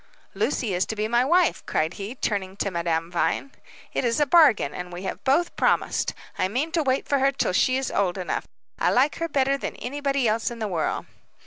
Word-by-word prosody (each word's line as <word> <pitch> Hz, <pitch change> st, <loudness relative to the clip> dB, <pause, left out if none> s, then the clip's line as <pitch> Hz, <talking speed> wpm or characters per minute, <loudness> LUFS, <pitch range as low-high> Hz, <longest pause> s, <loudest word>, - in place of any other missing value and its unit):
"Lucy 220 Hz, -6 st, -1 dB
is 180 Hz, +1 st, +2 dB
to 220 Hz, -, -3 dB
be 210 Hz, 0 st, -1 dB
my 240 Hz, +2 st, +3 dB
wife," 345 Hz, +5 st, +2 dB
cried 160 Hz, +2 st, 0 dB
he, 205 Hz, +6 st, -6 dB
turning 195 Hz, -5 st, -2 dB
to 200 Hz, -, -1 dB
Madame 170 Hz, -1 st, -1 dB
Vine. 225 Hz, +9 st, 0 dB, 0.4 s
"It -, -, 0 dB
is 235 Hz, +1 st, +1 dB
a 295 Hz, -, +4 dB
bargain, 280 Hz, -, +5 dB
and 180 Hz, 0 st, -6 dB
we 175 Hz, +2 st, -7 dB
have 190 Hz, -, -5 dB
both 285 Hz, +6 st, +2 dB
promised. -, -, +1 dB, 0.2 s
I -, -, +2 dB
mean 260 Hz, +11 st, -2 dB
to 335 Hz, -1 st, +1 dB
wait 265 Hz, -2 st, 0 dB
for 280 Hz, -, +2 dB
her 270 Hz, +1 st, +3 dB
till 270 Hz, -, -1 dB
she 255 Hz, +7 st, +3 dB
is 265 Hz, -, -2 dB
old 195 Hz, -2 st, 0 dB
enough. 185 Hz, -, -3 dB, 0.3 s
I -, -, +3 dB
like 270 Hz, +4 st, +2 dB
her 330 Hz, -, -1 dB
better 275 Hz, -1 st, +1 dB
than -, -, -4 dB
anybody 275 Hz, -1 st, -1 dB
else 220 Hz, +1 st, +1 dB
in 235 Hz, -, -7 dB
the 220 Hz, -2 st, -2 dB
world." 170 Hz, -5 st, -2 dB
235 Hz, 220 wpm, -25 LUFS, 190-275 Hz, 0.4 s, bargain